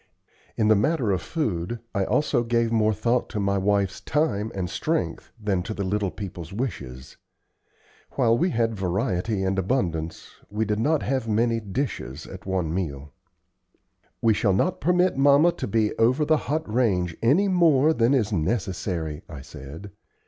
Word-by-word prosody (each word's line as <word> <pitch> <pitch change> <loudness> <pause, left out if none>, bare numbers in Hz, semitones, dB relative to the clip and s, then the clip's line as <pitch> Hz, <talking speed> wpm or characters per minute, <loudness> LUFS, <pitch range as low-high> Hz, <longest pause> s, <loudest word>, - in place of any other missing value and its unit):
In 110 - +2
the 110 - +6
matter 125 0 +1
of 95 -3 0
food, 115 - -2
I 100 -2 0
also 135 -1 +1
gave 115 -1 +1
more 110 -1 +3
thought 115 +4 0
to 110 - -3
my 100 0 +1
wife's 100 -1 0
time 115 -8 0
and 95 -2 -2
strength - - -2
than 100 -4 0
to 110 +4 -5
the 100 - -2
little 100 +1 0
people's 90 -4 -7
wishes. 70 - -5 1.0
While 115 -4 +3
we 175 +9 +1
had 115 -6 0
variety 95 +1 -1
and 95 0 0
abundance, 85 -7 -2
we 105 +2 -1
did 105 0 -1
not 150 +6 +1
have 130 -4 -1
many 115 +1 +1
dishes 100 - -4
at 95 0 -10
any - - -2
one 90 -4 -1
meal. 75 -6 -4 1.1
"We 115 -1 +5
shall 100 -1 +2
not 175 - 0
permit 180 -2 +2
mamma 145 +5 +5
to - - -5
be 110 0 +1
over 130 +7 +3
the 155 +1 +3
hot 155 +2 -1
range 100 -7 +1
any 150 - +4
more 160 -5 +4
than 120 0 +3
is 110 -5 0
necessary," 90 -4 -2
I 75 -5 -8
said. 75 +7 -10
105 Hz, 165 wpm, -25 LUFS, 95-125 Hz, 1.1 s, the